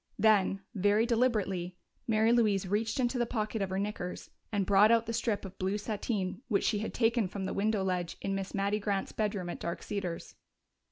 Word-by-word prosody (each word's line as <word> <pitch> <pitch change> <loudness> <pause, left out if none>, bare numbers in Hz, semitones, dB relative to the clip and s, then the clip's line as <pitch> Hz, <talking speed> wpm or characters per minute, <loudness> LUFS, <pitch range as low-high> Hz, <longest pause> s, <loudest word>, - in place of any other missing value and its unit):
Then, 200 -2 +3
very 205 +2 +3
deliberately, 205 -7 0 0.3
Mary 220 0 +3
Louise 210 -5 +3
reached 220 +6 0
into 245 0 +1
the 240 - +1
pocket 215 -2 -2
of 195 - -1
her 190 - -2
knickers 195 -3 -4 0.2
and 200 -3 0
brought 200 +2 +6
out 230 0 +4
the 230 - -3
strip 225 -3 -1
of 195 0 -10
blue 190 +2 0
sateen 210 -1 -3
which 205 -5 +1
she 210 - +1
had 215 - -3
taken 230 -3 +2
from 190 +1 -5
the - - -2
window 210 0 +1
ledge 180 -2 -2
in 195 - -2
Miss 195 0 -3
Mattie 200 +1 +1
Grant's 200 -2 -1
bedroom 205 -4 -2
at - - -7
Dark 170 0 -4
Cedars. 185 -5 -4
205 Hz, 200 wpm, -31 LUFS, 195-220 Hz, 0.3 s, brought